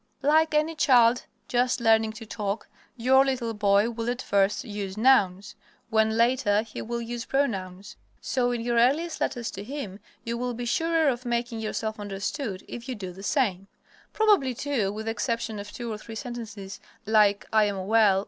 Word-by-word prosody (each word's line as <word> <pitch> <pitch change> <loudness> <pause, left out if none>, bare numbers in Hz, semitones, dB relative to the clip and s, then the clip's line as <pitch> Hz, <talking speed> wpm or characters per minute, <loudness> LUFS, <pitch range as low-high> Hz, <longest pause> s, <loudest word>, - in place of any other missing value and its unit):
Like 310 +2 +3
any 305 +2 +2
child 245 -6 +4 0.2
just 245 +1 +1
learning 220 -1 +3
to 225 +1 -9
talk, 210 -1 -4 0.3
your 260 +3 +5
little 255 -4 -1
boy 205 +1 +3
will 230 0 -3
at 245 0 -2
first 200 +1 +1
use 205 -2 -5
nouns, 210 -4 +3 0.4
when 220 0 +2
later 235 -3 +3
he 225 - -8
will 235 +1 -4
use 235 0 -5
pronouns, 200 -6 -2 0.2
so 250 -2 0
in 240 -1 -2
your 235 0 +1
earliest 300 +8 +2
letters 235 -2 -2
to 200 - -7
him 220 -6 -6 0.2
you 235 0 -3
will 245 -1 -2
be 245 +1 -4
surer 325 +5 +1
of 250 -2 0
making 240 -1 -2
yourself 220 0 -3
understood 200 +1 -4
if 240 +2 -8
you 255 - -2
do 190 -4 -6
the 185 +2 -11
same. 195 -5 0 0.4
Probably, 405 - +3
too, 240 -8 -1
with 215 +2 -6
the 225 - -1
exception 230 -2 -2
of 205 0 -8
two 235 -2 -5
or 210 - -6
three 225 +1 -9
sentences 220 -5 -7 0.3
like 210 -2 +3
"I 215 -1 +5
am 195 -2 -3
well. 210 -2 +4
230 Hz, 180 wpm, -26 LUFS, 205-250 Hz, 0.4 s, your